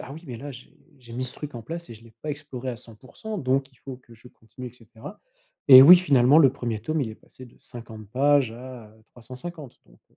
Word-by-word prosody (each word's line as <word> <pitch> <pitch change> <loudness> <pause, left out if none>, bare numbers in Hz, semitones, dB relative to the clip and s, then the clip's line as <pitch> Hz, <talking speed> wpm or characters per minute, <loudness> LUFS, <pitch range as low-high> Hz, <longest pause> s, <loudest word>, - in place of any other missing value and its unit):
«Ah 135 - -10
oui! 160 +3 -12
Mais 120 -3 -8
là, 145 +4 -9
j'ai 125 -2 -14 0.2
j'ai 120 -2 -15
mis 125 +2 -4
ce 125 - -9
truc 150 -2 -9
en 115 - -8
place 170 +7 -8
et 115 - -10
je 110 - -17
l'ai 115 - -18
pas 150 - -5
exploré 140 -3 -8
à 125 - -3
100% 115 0 -15 0.4
donc 135 -2 -1
il - - -27
faut 130 0 -10
que 120 -2 -21
je 115 +2 -18
continue» 125 +1 -13
et - - -25
cetera, 115 - -13 0.5
et 130 -1 +11
oui, 180 +6 +10
finalement 140 -5 +3
le 140 -5 +5
1er 120 -5 -4
tome 155 +4 -2
il 125 - -2
est 110 - -9
passé 130 +2 -16
de 120 - -22
50 115 -3 -12
pages 140 -1 +2
à, 125 -1 -11
heu, 110 +1 -24
350, 130 +5 -11
donc, - - -24
heu, - - -34
125 Hz, 255 wpm, -24 LUFS, 115-140 Hz, 0.5 s, et